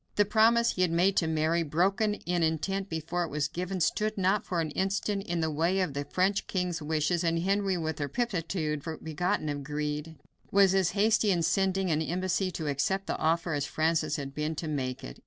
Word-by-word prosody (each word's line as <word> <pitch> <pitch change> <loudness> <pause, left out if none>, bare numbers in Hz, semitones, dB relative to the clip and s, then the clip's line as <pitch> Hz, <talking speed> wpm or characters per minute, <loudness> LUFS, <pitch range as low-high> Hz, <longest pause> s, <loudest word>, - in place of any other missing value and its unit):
The 205 - +4
promise 230 +3 +4
he 185 - -3
had 180 - +3
made 180 +4 +2
to 165 - +3
Mary, 160 +1 +1
broken 190 +7 +1
in 175 -3 -2
intent 190 +5 -1
before 165 +2 -2
it 170 - -4
was 150 0 -1
given, 180 +2 -4
stood 215 +5 0
not 195 +2 +2
for 175 - -2
an 160 -2 -1
instant 195 +3 -1
in 170 -1 -1
the 160 -1 0
way 170 +5 +1
of 180 -6 0
the 140 +1 -3
French 190 +5 0
king's 180 -3 -2
wishes; 160 +3 0
and 165 -1 +1
Henry, 195 -1 +1
with 160 -2 -3
a 145 - -2
promptitude 165 - -2 0.2
begotten 170 +2 -1
of 145 -1 -3
greed, 150 +2 -3 0.3
was 195 -1 +5
as 190 -3 +2
hasty 215 +1 +3
in 175 -3 +2
sending 190 +1 +1
an 155 0 +1
embassy 185 +3 -1
to 165 -3 -5
accept 150 +7 0
the - - -2
offer 165 +1 +1
as 145 -1 -1
Francis 160 +2 0
had 140 -2 -5
been 150 +2 -2
to 160 - -4
make 130 -4 -3
it. - - -9
170 Hz, 210 wpm, -29 LUFS, 155-195 Hz, 0.3 s, was